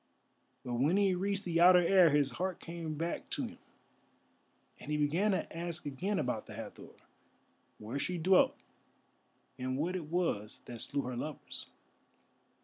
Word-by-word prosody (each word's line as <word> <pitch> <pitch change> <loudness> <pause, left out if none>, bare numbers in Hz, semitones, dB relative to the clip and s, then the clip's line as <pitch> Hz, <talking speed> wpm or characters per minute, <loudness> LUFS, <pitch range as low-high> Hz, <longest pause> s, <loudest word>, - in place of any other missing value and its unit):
But 120 -1 -2
when 155 +9 +3
he 200 -2 +3
reached 200 +2 -1
the 170 -1 +1
outer 180 +1 +9
air, 185 -2 +6
his 145 -2 +2
heart 185 +7 -3
came 165 -2 -5
back 165 +3 -3
to - - -1
him, - - -10 1.2
and - - -10
he 150 - +1
began 160 +8 +2
to 190 -4 -1
ask 170 0 -4
again 180 +9 -2
about 125 - -2
the - - -9
Hathor—where 115 +6 -11
she 180 +4 -2
dwelt, 185 +3 +4 1.0
and 130 +1 -2
what 170 +6 -1
it 175 -4 -3
was 155 - -2
that 120 -2 -7
slew 140 0 -1
her 125 0 -4
lovers. 150 +5 -6
165 Hz, 150 wpm, -33 LUFS, 140-180 Hz, 1.2 s, outer